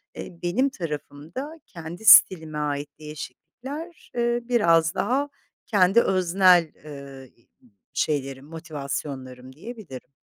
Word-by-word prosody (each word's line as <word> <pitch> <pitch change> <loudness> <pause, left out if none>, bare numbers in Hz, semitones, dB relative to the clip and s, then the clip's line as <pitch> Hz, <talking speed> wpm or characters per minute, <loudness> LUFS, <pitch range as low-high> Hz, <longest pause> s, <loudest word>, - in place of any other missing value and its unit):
eee, 170 -2 -9
benim 215 +11 +1
tarafımda 170 - -7
kendi 170 +4 -9
stilime 160 -8 +7
ait 145 -1 -2
değişiklikler, 170 - -9
eee, 240 0 +1
biraz 170 -8 +3
daha 275 +7 0 0.4
kendi 200 +1 +4
öznel, 185 -3 +4
eee, 140 -3 -10
iii, 115 - -32 0.4
şeylerim, 135 -2 -2
motivasyonlarım 140 -5 -6
diyebilirim. 180 - -10
165 Hz, 100 wpm, -24 LUFS, 145-220 Hz, 0.4 s, stilime